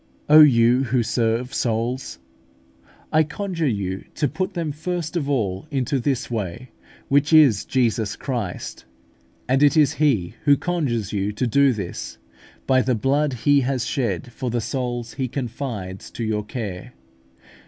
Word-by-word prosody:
O 150 Hz, +1 st, +8 dB
you 125 Hz, -3 st, +6 dB
who 125 Hz, 0 st, +1 dB
serve 115 Hz, +2 st, -1 dB
souls! 120 Hz, -, -2 dB, 0.9 s
I 155 Hz, -, +4 dB
conjure 165 Hz, 0 st, -2 dB
you 100 Hz, -5 st, -2 dB
to 150 Hz, -, +1 dB
put 185 Hz, +7 st, -3 dB
them 165 Hz, -3 st, -2 dB
first 165 Hz, +2 st, -4 dB
of 145 Hz, -5 st, -1 dB
all 105 Hz, -4 st, -1 dB
into 135 Hz, -1 st, -1 dB
this 130 Hz, -1 st, -2 dB
way, 115 Hz, +3 st, -4 dB, 0.4 s
which 145 Hz, +2 st, +2 dB
is 145 Hz, -10 st, +6 dB
Jesus 115 Hz, -4 st, 0 dB
Christ; 115 Hz, -10 st, -5 dB, 0.6 s
and 130 Hz, +2 st, +2 dB
it 145 Hz, +2 st, +5 dB
is 150 Hz, -2 st, +4 dB
He 110 Hz, -, +2 dB
who 145 Hz, -1 st, +5 dB
conjures 130 Hz, -, -2 dB
you 100 Hz, 0 st, -1 dB
to 125 Hz, -, -1 dB
do 140 Hz, +3 st, +4 dB
this 100 Hz, -7 st, -5 dB, 0.5 s
by 130 Hz, -1 st, +4 dB
the 130 Hz, -1 st, +1 dB
blood 140 Hz, +5 st, +1 dB
He 145 Hz, -1 st, +5 dB
has 130 Hz, -1 st, -1 dB
shed 120 Hz, -3 st, -2 dB
for 125 Hz, +1 st, -4 dB
the 120 Hz, +1 st, -1 dB
souls 120 Hz, -1 st, -3 dB
He 130 Hz, +2 st, -2 dB
confides 115 Hz, -7 st, -5 dB
to 115 Hz, -, -4 dB
your 105 Hz, -1 st, -1 dB
care. 105 Hz, -7 st, -6 dB
125 Hz, 155 wpm, -22 LUFS, 110-145 Hz, 0.9 s, O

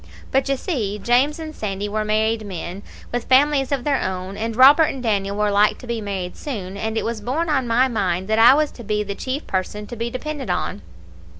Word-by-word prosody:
But, 270 Hz, +1 st, +1 dB
you 275 Hz, -, +1 dB
see, 220 Hz, -, -2 dB
James 245 Hz, +8 st, +2 dB
and 315 Hz, -1 st, -7 dB
Sandy 205 Hz, -1 st, -3 dB
were 215 Hz, +1 st, -1 dB
married 220 Hz, +1 st, +1 dB
men, 185 Hz, -1 st, -6 dB, 0.3 s
with 240 Hz, -1 st, -2 dB
families 270 Hz, +1 st, +3 dB
of 275 Hz, -3 st, 0 dB
their 285 Hz, -1 st, +1 dB
own, 185 Hz, +1 st, -4 dB
and 225 Hz, +2 st, -3 dB
Robert 280 Hz, +6 st, +7 dB
and 270 Hz, -4 st, -4 dB
Daniel 200 Hz, -3 st, 0 dB
were 210 Hz, 0 st, +1 dB
like 205 Hz, +1 st, +3 dB
to -, -, -11 dB
be 235 Hz, -2 st, -3 dB
married 190 Hz, -3 st, -4 dB
soon, 200 Hz, -10 st, -6 dB
and 220 Hz, +2 st, -3 dB
it -, -, -1 dB
was 230 Hz, -2 st, -3 dB
borne 300 Hz, +9 st, -1 dB
on 270 Hz, -5 st, +1 dB
my 240 Hz, +3 st, +3 dB
mind 190 Hz, -6 st, -1 dB
that 220 Hz, +1 st, +1 dB
I 240 Hz, +4 st, +8 dB
was 305 Hz, 0 st, +1 dB
to 235 Hz, -, -11 dB
be 210 Hz, 0 st, -1 dB
the 200 Hz, -1 st, -4 dB
chief 260 Hz, +8 st, -4 dB
person 195 Hz, +2 st, -3 dB
to 240 Hz, -, -8 dB
be 230 Hz, +1 st, -3 dB
depended 270 Hz, -1 st, -5 dB
on. 180 Hz, -, -2 dB
225 Hz, 225 wpm, -21 LUFS, 205-265 Hz, 0.3 s, I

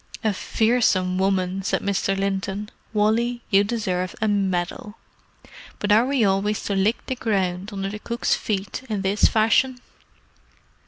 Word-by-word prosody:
"A 215 Hz, -2 st, +2 dB
fearsome 190 Hz, -4 st, +1 dB
woman!" 190 Hz, -1 st, 0 dB
said 190 Hz, -, -1 dB
Mr. 195 Hz, -1 st, 0 dB
Linton. 195 Hz, +1 st, -2 dB, 0.2 s
"Wally, 230 Hz, +3 st, +1 dB
you 195 Hz, 0 st, +5 dB
deserve 190 Hz, -5 st, -2 dB
a 220 Hz, -, +1 dB
medal! 195 Hz, 0 st, -1 dB, 0.8 s
But 205 Hz, -, -1 dB
are 225 Hz, +4 st, +5 dB
we 270 Hz, -5 st, +2 dB
always 200 Hz, +2 st, 0 dB
to 200 Hz, -, -2 dB
lick 205 Hz, +5 st, +1 dB
the -, -, -2 dB
ground 195 Hz, -5 st, -1 dB
under 195 Hz, -1 st, -3 dB
the 210 Hz, +1 st, -6 dB
cook's 235 Hz, +3 st, -1 dB
feet 200 Hz, +1 st, -2 dB
in 205 Hz, -3 st, -2 dB
this 195 Hz, +2 st, +2 dB
fashion?" 250 Hz, +4 st, +3 dB
200 Hz, 145 wpm, -23 LUFS, 195-220 Hz, 0.8 s, you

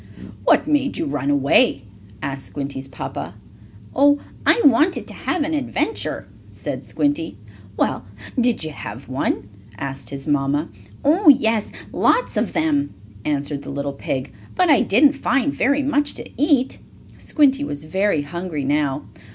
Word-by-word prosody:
"What -, -, +5 dB
made 290 Hz, -3 st, +1 dB
you 325 Hz, -, -1 dB
run 145 Hz, -, -2 dB
away?" 140 Hz, -, +3 dB, 0.4 s
asked 135 Hz, -1 st, -4 dB
Squinty's 140 Hz, -1 st, -5 dB
papa. 85 Hz, -, -6 dB, 0.6 s
"Oh, 285 Hz, +2 st, +5 dB, 0.3 s
I -, -, +6 dB
wanted 300 Hz, +7 st, +4 dB
to -, -, -8 dB
have 350 Hz, -4 st, -1 dB
an 315 Hz, +2 st, -2 dB
adventure," 300 Hz, -, -2 dB, 0.3 s
said -, -, -5 dB
Squinty. 290 Hz, +3 st, -1 dB, 0.4 s
"Well, -, -, 0 dB, 0.3 s
did 240 Hz, -6 st, +2 dB
you 155 Hz, -, -4 dB
have 120 Hz, -2 st, -8 dB
one?" 130 Hz, -6 st, -1 dB, 0.3 s
asked 135 Hz, +3 st, -5 dB
his 135 Hz, -1 st, -6 dB
mamma. 145 Hz, +1 st, +1 dB, 0.4 s
"Oh, 320 Hz, +4 st, +5 dB
yes, 225 Hz, -6 st, +4 dB, 0.2 s
lots -, -, +2 dB
of -, -, 0 dB
them," 310 Hz, -3 st, 0 dB, 0.3 s
answered 145 Hz, -1 st, -1 dB
the -, -, -9 dB
little 140 Hz, 0 st, -3 dB
pig. 130 Hz, -1 st, -4 dB, 0.2 s
"But 365 Hz, -3 st, +4 dB
I 285 Hz, -, +6 dB
didn't 275 Hz, +8 st, +5 dB
find 280 Hz, 0 st, +1 dB
very 280 Hz, +2 st, +2 dB
much 290 Hz, +1 st, 0 dB
to -, -, -7 dB
eat." 280 Hz, -3 st, +2 dB, 0.4 s
Squinty 285 Hz, -2 st, +3 dB
was 145 Hz, -, -4 dB
very 190 Hz, -2 st, +1 dB
hungry 170 Hz, -1 st, -4 dB
now. 145 Hz, 0 st, 0 dB
225 Hz, 145 wpm, -21 LUFS, -, 0.6 s, I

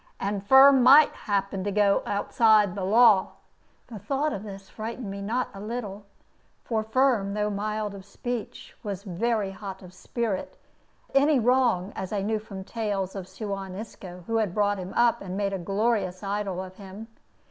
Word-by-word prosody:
And 200 Hz, 0 st, -2 dB
Firm 265 Hz, +4 st, +7 dB
might 280 Hz, +4 st, +7 dB
happen 195 Hz, -2 st, -2 dB
to 205 Hz, -, -1 dB
go 200 Hz, 0 st, +3 dB
outside 210 Hz, -1 st, +3 dB
the 195 Hz, -, -4 dB
law." 210 Hz, 0 st, +5 dB, 0.5 s
The 220 Hz, -4 st, -9 dB
thought 285 Hz, +8 st, -1 dB
of 195 Hz, -, -5 dB
this 195 Hz, -2 st, -9 dB
frightened 225 Hz, -1 st, -6 dB
me 200 Hz, 0 st, -6 dB
not 235 Hz, +5 st, -1 dB
a 195 Hz, -, -9 dB
little; 210 Hz, -2 st, -6 dB, 0.6 s
for 225 Hz, -2 st, -1 dB
Firm, 220 Hz, -3 st, +1 dB
though 210 Hz, 0 st, 0 dB
mild 210 Hz, 0 st, -3 dB
of 195 Hz, -1 st, -10 dB
speech, 240 Hz, +3 st, -6 dB
was 200 Hz, -2 st, -5 dB
very 210 Hz, +1 st, -1 dB
hot 195 Hz, -1 st, -8 dB
of 180 Hz, 0 st, -13 dB
spirit 215 Hz, 0 st, -4 dB, 0.6 s
at -, -, +4 dB
any 290 Hz, +1 st, +4 dB
wrong, 235 Hz, -6 st, +2 dB
as 190 Hz, -, -5 dB
I 200 Hz, -2 st, -1 dB
knew 215 Hz, +1 st, 0 dB
from 200 Hz, -3 st, -9 dB
tales 200 Hz, -3 st, -3 dB
of 190 Hz, -2 st, -6 dB
Suan 195 Hz, -1 st, -6 dB
Isco, 185 Hz, -4 st, -9 dB
who 225 Hz, +3 st, -1 dB
had 210 Hz, -5 st, -1 dB
brought 205 Hz, -1 st, +1 dB
him 185 Hz, 0 st, -6 dB
up 235 Hz, 0 st, +3 dB
and 190 Hz, -1 st, -5 dB
made 200 Hz, -1 st, -1 dB
a 195 Hz, -, -2 dB
glorious 195 Hz, 0 st, -1 dB
idol 195 Hz, -2 st, -3 dB
of 185 Hz, 0 st, -12 dB
him. 200 Hz, +2 st, -10 dB
205 Hz, 180 wpm, -26 LUFS, 195-225 Hz, 0.6 s, Firm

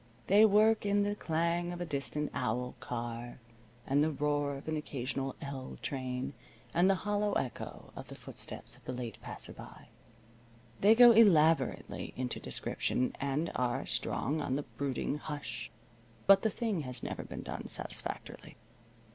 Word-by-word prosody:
They 205 Hz, +3 st, +7 dB
work 215 Hz, +1 st, +5 dB
in 205 Hz, 0 st, +3 dB
the 205 Hz, 0 st, 0 dB
clang 170 Hz, -1 st, 0 dB
of 175 Hz, -, -6 dB
a 175 Hz, -, -2 dB
distant 150 Hz, 0 st, -3 dB
owl 125 Hz, 0 st, -1 dB
car, 120 Hz, -1 st, -5 dB, 0.5 s
and 140 Hz, +2 st, +3 dB
the 155 Hz, -, +2 dB
roar 145 Hz, -1 st, 0 dB
of 140 Hz, -, -12 dB
an 155 Hz, -, 0 dB
occasional 135 Hz, -2 st, -3 dB
"L" 135 Hz, -2 st, -6 dB
train, 130 Hz, 0 st, -3 dB, 0.4 s
and 175 Hz, +3 st, +4 dB
the 195 Hz, -, +5 dB
hollow 205 Hz, 0 st, +1 dB
echo 125 Hz, -, -4 dB
of -, -, -8 dB
the -, -, -9 dB
footsteps -, -, -8 dB
of -, -, -21 dB
the 130 Hz, -, -3 dB
late 120 Hz, -3 st, -6 dB
passer -, -, -7 dB
by. -, -, -12 dB, 0.9 s
They 210 Hz, +3 st, +7 dB
go 240 Hz, 0 st, +10 dB
elaborately 165 Hz, -, +4 dB
into 125 Hz, -1 st, -2 dB
description, 125 Hz, -, -1 dB
and 140 Hz, +4 st, 0 dB
are 125 Hz, +1 st, 0 dB
strong 155 Hz, +3 st, -1 dB
on 130 Hz, -2 st, -1 dB
the 145 Hz, -, -1 dB
brooding 140 Hz, +1 st, -2 dB
hush, 145 Hz, -6 st, -5 dB, 0.6 s
but 195 Hz, 0 st, +8 dB
the 220 Hz, -, +2 dB
thing 215 Hz, -6 st, -1 dB
has 125 Hz, -3 st, -6 dB
never -, -, -3 dB
been -, -, -7 dB
done -, -, -5 dB
satisfactorily. -, -, -4 dB
145 Hz, 155 wpm, -32 LUFS, 130-190 Hz, 0.9 s, go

